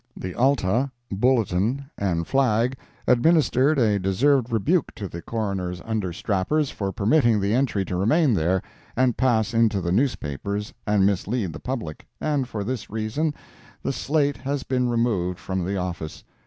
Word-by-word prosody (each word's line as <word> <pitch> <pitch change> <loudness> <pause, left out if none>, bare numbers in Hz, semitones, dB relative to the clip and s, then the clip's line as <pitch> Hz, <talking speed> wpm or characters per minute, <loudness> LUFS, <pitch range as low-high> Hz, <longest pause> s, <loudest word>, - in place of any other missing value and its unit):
The 95 - -5
Alta, 130 -1 +2 0.2
Bulletin, 120 - +1
and 85 -4 -1
Flag, 125 0 +2 0.3
administered 145 +1 +3
a 105 -5 +3
deserved 120 +7 +2
rebuke 140 - +1
to 105 -4 -5
the 85 -1 -7
Coroner's 95 -5 -3
understrappers, 105 - -1
for 100 -2 -3
permitting 115 +1 +3
the 100 +1 0
entry 120 -6 +1
to 90 - -3
remain 130 - +3
there, 90 +1 +1 0.3
and 125 -1 +2
pass 115 -3 +1
into 115 -3 +3
the 85 -2 -2
newspapers 100 - -1
and 105 -2 +3
mislead 100 -1 0
the 75 - -7
public, 115 - -5
and 145 -4 0
for 110 -4 -4
this 120 +1 -4
reason 110 +9 -1 0.5
the - - -1
slate 145 -1 0
has 135 +3 -3
been 125 -1 0
removed 110 -7 0
from 95 -1 -3
the 100 +2 -2
office. 85 -4 -5
110 Hz, 150 wpm, -24 LUFS, 95-130 Hz, 0.5 s, administered